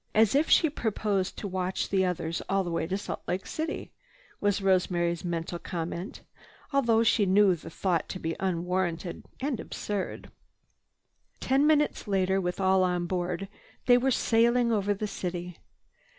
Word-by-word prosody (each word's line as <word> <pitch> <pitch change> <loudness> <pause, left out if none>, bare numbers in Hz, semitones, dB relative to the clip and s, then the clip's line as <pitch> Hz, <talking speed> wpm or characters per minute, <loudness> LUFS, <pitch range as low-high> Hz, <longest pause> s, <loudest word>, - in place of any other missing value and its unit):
"As 220 -1 +5
if 290 +3 +2
she 320 - +6
proposed 210 -8 -1
to 205 - -4
watch 185 0 -2
the 190 -1 +2
others 170 -2 -2
all 195 0 +2
the 175 - -4
way 165 -1 -1
to 190 +2 -1
Salt 200 - -5
Lake 180 +2 -2
City," 315 0 -4 0.5
was 205 -1 +1
Rosemary's 175 -3 +1
mental 170 0 -3
comment, 175 +3 -5 0.5
although 235 -5 +3
she 215 -2 +3
knew 195 0 +5
the 165 0 -10
thought 175 0 -1
to - - -4
be 165 -1 -3
unwarranted 180 -1 -2 0.2
and 270 -3 -2
absurd. 205 -2 -4 1.1
Ten 275 +3 +2
minutes 300 -6 +2
later, 190 -1 +1
with 180 +1 -3
all 190 0 +3
on 180 -1 0
board, 180 +1 -2 0.4
they 245 0 +6
were 265 +2 +1
sailing 235 0 +3
out 220 - +3
over 205 +1 0
the 210 - -3
city. 180 -3 -5
190 Hz, 160 wpm, -28 LUFS, 175-215 Hz, 1.1 s, she